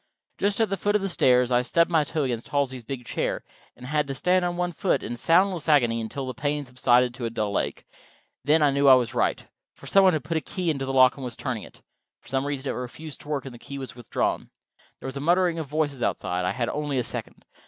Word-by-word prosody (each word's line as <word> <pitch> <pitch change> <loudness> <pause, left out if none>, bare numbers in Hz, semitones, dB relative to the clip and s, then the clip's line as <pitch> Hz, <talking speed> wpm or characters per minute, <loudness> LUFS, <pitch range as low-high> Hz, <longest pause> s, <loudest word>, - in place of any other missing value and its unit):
Just 200 +1 0
at 220 -3 +1
the 195 - 0
foot 205 +3 0
of 210 - +1
the - - 0
stairs 125 -7 +3
I 120 0 +4
stubbed 170 +7 +2
my 160 -2 +4
toe 155 +1 -2
against 120 -3 -3
Halsey's 130 -4 -1
big 125 +1 -6
chair, - - -2 0.3
and - - -11
had 150 +2 0
to 135 - -4
stand 180 +5 +2
on 175 0 -1
one 175 0 -1
foot 185 +2 0
in - - -4
a - - -4
soundless 170 +5 +2
agony 120 -6 +3
until 130 +5 -5
the 130 - -4
pain 145 +4 -2
subsided 125 -1 +2
to 125 -1 -5
a - - -1
dull 105 -3 -1
ache. - - -4
And - - -24 0.4
then—I 150 0 +4
knew 140 +1 +2
I 130 - +10
was 125 -2 0
right. - - 0 0.3
Some 195 - +3
one 185 -1 +5
had 155 -4 -1
put 165 - -2
a - - -1
key 175 +3 -2
into 135 -3 -3
the 135 - -3
lock, 130 0 +5
and 135 - -7
was 120 -2 -5
turning 125 -6 -3
it. - - -14 0.4
For - - -16
some 135 +2 -1
reason 140 -1 -3
it - - -1
refused 140 +5 -7
to - - -14
work, 145 -3 -2
and 135 - -8
the 120 - -12
key 140 - -8
was 130 -4 -7
withdrawn. 120 -2 -2 0.5
There - - -7
was 130 +1 -5
a - - -4
muttering 175 +1 +2
of 160 - -4
voices 145 -3 -1
outside: 90 -5 -1
I 90 - 0
had 120 -2 -2
only 145 -2 -2
a 125 - +1
second. - - -6
140 Hz, 260 wpm, -25 LUFS, 125-160 Hz, 0.5 s, I